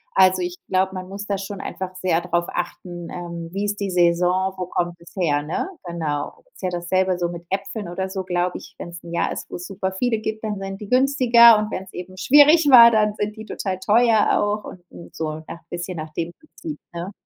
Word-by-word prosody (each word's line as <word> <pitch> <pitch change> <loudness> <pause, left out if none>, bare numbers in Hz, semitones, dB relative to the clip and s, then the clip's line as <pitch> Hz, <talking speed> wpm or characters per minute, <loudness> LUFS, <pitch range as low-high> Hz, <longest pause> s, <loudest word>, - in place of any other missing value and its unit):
Also, 185 0 +5
ich 175 0 -4
glaube, 190 0 +1
man 185 0 -6
muss 200 +1 -6
da 200 -1 0
schon 195 0 -6
einfach 185 -1 -6
sehr 180 -2 +1
drauf 175 -1 0
achten, 175 0 -5
ähm, 170 -1 -6
wie 200 +1 -2
ist 205 0 -2
die 200 - -1
Saison, 180 +2 +2
wo 185 - -3
kommt 175 -1 -2
das 170 - -16
her, 150 -6 +1
ne? 160 - -3 0.2
Genau, 155 -4 -4
ist - - -17
ja 185 - +1
dasselbe 180 +1 0
so 175 - 0
mit 170 0 -8
Äpfeln 195 +1 -3
oder 190 +2 -3
so, 190 -1 -4
glaube 180 0 -1
ich. - - -14
Wenn's 170 0 -8
'n 170 0 -9
Jahr 170 - 0
ist, - - -6
wo's 175 - -6
super 190 -1 -3
viele 230 +3 0
gibt, 220 0 -4
dann 210 -2 -3
sind 195 +1 -6
die 205 - -8
günstiger, 250 -3 +6
und 215 +1 -3
wenn's 190 0 -6
eben 185 +1 -8
schwierig 295 - +6
war, 235 -2 +10
dann 210 -2 +2
sind 210 +1 -3
die 220 - -8
total 190 -3 -4
teuer 220 +2 +3
auch 210 0 -1 0.2
und 170 - -13
so, 155 -1 -4
ja, 170 - -8
bisschen 175 +1 -5
nach 155 0 -6
dem 170 +1 -3
Prinzip, 310 0 -9 0.2
ne? 175 +3 -5
185 Hz, 220 wpm, -22 LUFS, 175-210 Hz, 0.2 s, war